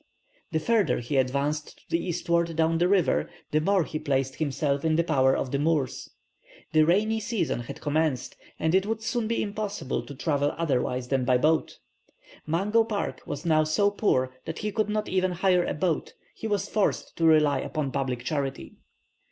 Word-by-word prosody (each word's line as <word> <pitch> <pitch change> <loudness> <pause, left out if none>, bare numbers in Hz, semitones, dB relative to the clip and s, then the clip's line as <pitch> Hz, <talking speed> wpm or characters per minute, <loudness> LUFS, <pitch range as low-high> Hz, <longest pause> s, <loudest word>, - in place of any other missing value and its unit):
The - - +1
further 220 +4 +2
he 120 +4 -2
advanced 140 +4 -1
to - - -24
the 170 - +1
eastward 170 -1 0
down 165 +1 +2
the 175 - +3
river, 180 - +2 0.2
the 155 - +2
more 195 +2 +3
he 155 - -5
placed 135 -2 -1
himself 140 -2 -1
in 160 -1 +2
the 170 - +3
power 135 -5 +3
of 130 - -3
the 140 - 0
Moors. 150 -4 0 0.6
The 155 -1 +5
rainy 215 +5 +2
season 220 - -1
had 120 - -8
commenced, 150 -3 0 0.2
and 160 +1 0
it 190 +2 +3
would 220 0 -2
soon 240 -1 -1
be 230 - 0
impossible 205 -8 -3
to 140 - -8
travel 145 0 0
otherwise 130 -5 -1
than 135 -2 +1
by 125 0 +3
boat. 155 +5 +1 0.7
Mungo 200 +8 +2
Park 205 - -3
was 145 +4 -5
now 155 -2 +4
so 200 +7 +2
poor 130 -11 +1
that 160 - -5
he 210 - -3
could 215 +1 0
not 215 0 -1
even 185 -1 +1
hire 180 0 +3
a - - -2
boat; 160 0 -1 0.2
he 225 - -5
was 205 -2 -1
forced 210 -1 -1
to 165 - +1
rely 150 -3 +5
upon 145 0 -3
public 125 -3 -2
charity. 135 0 -3
160 Hz, 185 wpm, -27 LUFS, 140-195 Hz, 0.7 s, The